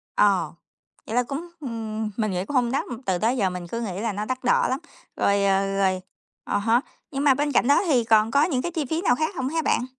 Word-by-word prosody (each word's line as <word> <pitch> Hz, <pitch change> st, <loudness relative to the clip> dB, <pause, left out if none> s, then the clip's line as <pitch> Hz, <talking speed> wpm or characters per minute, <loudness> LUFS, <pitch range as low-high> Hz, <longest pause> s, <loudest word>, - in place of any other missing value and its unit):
Ờ, 190 Hz, -7 st, +3 dB, 0.5 s
vậy 225 Hz, -, -3 dB
là 245 Hz, -, +3 dB
cũng 285 Hz, +8 st, -6 dB
ừm, 220 Hz, -5 st, -4 dB
mình 215 Hz, -3 st, 0 dB
nghĩ 180 Hz, +1 st, -2 dB
cũng 290 Hz, -, -5 dB
không 245 Hz, -2 st, +2 dB
đắt, 275 Hz, -, 0 dB, 0.2 s
từ 185 Hz, -2 st, +1 dB
tới 230 Hz, +7 st, +1 dB
giờ 195 Hz, -4 st, +2 dB
mình 180 Hz, -1 st, -6 dB
cứ 230 Hz, +6 st, -4 dB
nghĩ 195 Hz, -4 st, -4 dB
là 230 Hz, -2 st, -1 dB
nó 205 Hz, +2 st, -3 dB
đắt 255 Hz, +2 st, -4 dB
đỏ 245 Hz, -, +3 dB
lắm. 260 Hz, +2 st, -1 dB, 0.4 s
Rồi, 200 Hz, 0 st, +2 dB
ờ, 195 Hz, 0 st, +1 dB
rồi 190 Hz, -1 st, +1 dB, 0.4 s
à -, -, -1 dB
há, 225 Hz, +4 st, +2 dB, 0.3 s
nhưng 275 Hz, 0 st, -2 dB
mà 280 Hz, -, +6 dB
bên 290 Hz, +2 st, -1 dB
cạnh 245 Hz, -, +3 dB
đó 285 Hz, -, +5 dB
thì 250 Hz, -6 st, +3 dB
còn 220 Hz, 0 st, +3 dB
có 280 Hz, +3 st, +4 dB
những 285 Hz, -7 st, 0 dB
cái 345 Hz, -, -3 dB
chi 320 Hz, -4 st, -2 dB
phí 320 Hz, +2 st, 0 dB
nào 245 Hz, -10 st, +3 dB
khác 315 Hz, +4 st, -2 dB
hông 260 Hz, 0 st, -2 dB
hả 325 Hz, +2 st, 0 dB
bạn? 250 Hz, -, +1 dB
235 Hz, 260 wpm, -24 LUFS, 200-275 Hz, 0.5 s, mà